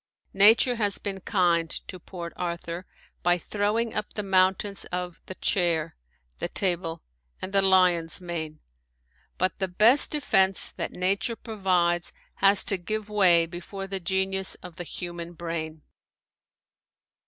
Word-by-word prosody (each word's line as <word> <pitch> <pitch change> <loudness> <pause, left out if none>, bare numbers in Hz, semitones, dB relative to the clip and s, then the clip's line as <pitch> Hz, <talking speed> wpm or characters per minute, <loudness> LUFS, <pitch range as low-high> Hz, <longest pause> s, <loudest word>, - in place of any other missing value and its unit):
Nature 225 +5 +6
has 205 -3 0
been 195 -1 -4
kind 175 -5 +1 0.2
to 185 - -8
Port 170 -1 -8
Arthur 170 0 -5 0.3
by 175 0 +3
throwing 210 +5 -1
up 210 - -4
the 210 - -3
mountains 190 +1 +2
of 180 -1 -5
"The 185 - -6
Chair," 165 -5 0 0.4
"The - - -1
Table," 170 -3 -1 0.4
and 190 - -6
the 195 - +4
"Lion's 180 -3 +3
Mane," 160 -4 -6 0.8
but 185 +2 -1
the 190 - 0
best 220 +10 +4
defense 195 -10 +2
that - - -4
nature 195 +5 -1
provides 180 -6 0 0.2
has 195 0 +5
to 195 - 0
give 215 +4 -4
way 180 -5 +4
before 180 +3 -7
the 195 0 -4
genius 190 +1 +1
of 180 -1 -10
the 175 - -5
human 175 0 -7
brain. 160 -2 -5
185 Hz, 135 wpm, -26 LUFS, 170-195 Hz, 0.8 s, Nature